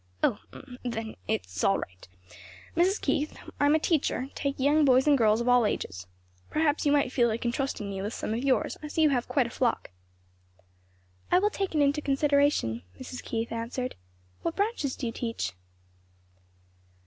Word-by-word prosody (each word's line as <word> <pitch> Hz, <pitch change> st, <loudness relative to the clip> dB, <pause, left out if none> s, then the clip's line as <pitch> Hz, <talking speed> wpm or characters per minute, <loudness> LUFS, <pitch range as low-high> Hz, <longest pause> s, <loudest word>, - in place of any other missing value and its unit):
"Oh! 205 Hz, -, +2 dB, 0.4 s
then 225 Hz, -3 st, -4 dB
it's 90 Hz, +1 st, -2 dB
all 195 Hz, -, +4 dB
right. 90 Hz, 0 st, -8 dB, 0.7 s
"Mrs. 365 Hz, +5 st, +3 dB
Keith, 300 Hz, +2 st, -1 dB, 0.2 s
I'm 290 Hz, +1 st, +4 dB
a -, -, +3 dB
teacher; 290 Hz, -5 st, 0 dB
take 280 Hz, -1 st, -3 dB
young 295 Hz, +3 st, +4 dB
boys 260 Hz, -2 st, +5 dB
and 295 Hz, -1 st, +5 dB
girls 220 Hz, -3 st, +3 dB
of 235 Hz, -, -3 dB
all 245 Hz, -1 st, +5 dB
ages. 90 Hz, -, -3 dB, 0.4 s
Perhaps 305 Hz, -1 st, +1 dB
you -, -, +4 dB
might 285 Hz, -3 st, +2 dB
feel 240 Hz, -3 st, +3 dB
like 230 Hz, +1 st, -2 dB
entrusting 240 Hz, -3 st, -1 dB
me 195 Hz, -1 st, -4 dB
with 205 Hz, +2 st, -3 dB
some 220 Hz, -, -3 dB
of 235 Hz, +3 st, -2 dB
yours. 275 Hz, -2 st, +1 dB
I 305 Hz, -, -5 dB
see 315 Hz, +1 st, +1 dB
you 305 Hz, -, +5 dB
have 245 Hz, -3 st, 0 dB
quite 270 Hz, -4 st, +2 dB
a 235 Hz, -, -6 dB
flock." 240 Hz, -, -1 dB, 1.4 s
"I 360 Hz, -, +6 dB
will 415 Hz, +3 st, +2 dB
take 390 Hz, -5 st, -3 dB
it 300 Hz, -, +3 dB
into 285 Hz, +2 st, +2 dB
consideration," 280 Hz, -, +2 dB, 0.2 s
Mrs. 255 Hz, 0 st, -7 dB
Keith 230 Hz, 0 st, -3 dB
answered; 235 Hz, +2 st, -3 dB, 0.5 s
"What 335 Hz, -, -2 dB
branches 400 Hz, -, -1 dB
do 260 Hz, -, -5 dB
you 230 Hz, -, -1 dB
teach?" 230 Hz, -, -3 dB
260 Hz, 175 wpm, -28 LUFS, 230-295 Hz, 1.4 s, I